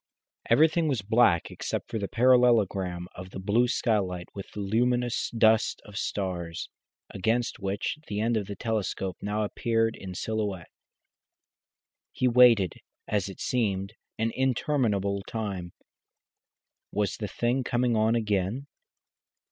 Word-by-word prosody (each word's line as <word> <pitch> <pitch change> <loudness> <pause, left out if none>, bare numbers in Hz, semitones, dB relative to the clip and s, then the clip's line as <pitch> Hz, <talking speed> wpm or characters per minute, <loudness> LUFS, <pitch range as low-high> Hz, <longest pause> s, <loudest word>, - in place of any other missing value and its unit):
Everything 160 +2 +4
was 130 -9 -1
black 105 -5 +3
except - - -4
the 105 -4 -2
parallelogram 110 -8 +3
of 90 +1 -9
the - - -9
blue 105 +6 +2
skylight 95 -8 0
with 100 - -8
the - - -8
luminous 120 +4 +1
dust 110 -1 +3
of 105 - -12
stars, 90 -6 -3 0.4
against 115 +6 -1
which 100 +9 -2
the 105 0 -3
end 115 +2 +1
of 105 -3 -1
the 100 - -5
telescope 100 -5 -2
now 105 +1 -1
appeared 115 +1 0
in 95 -2 -8
silhouette. 105 -4 -3 1.4
He 130 - +1
waited, 120 -6 +5 0.3
as 100 -2 0
it 95 - -10
seemed, 100 -5 -1 0.2
an 115 +1 0
interminable 115 -7 0
time. 100 -6 -4 1.2
Was 105 -2 -1
the 105 - -4
thing 120 +5 0
coming 120 -1 +1
on 110 +1 +3
again? 105 +3 -1
110 Hz, 125 wpm, -27 LUFS, 95-120 Hz, 1.4 s, waited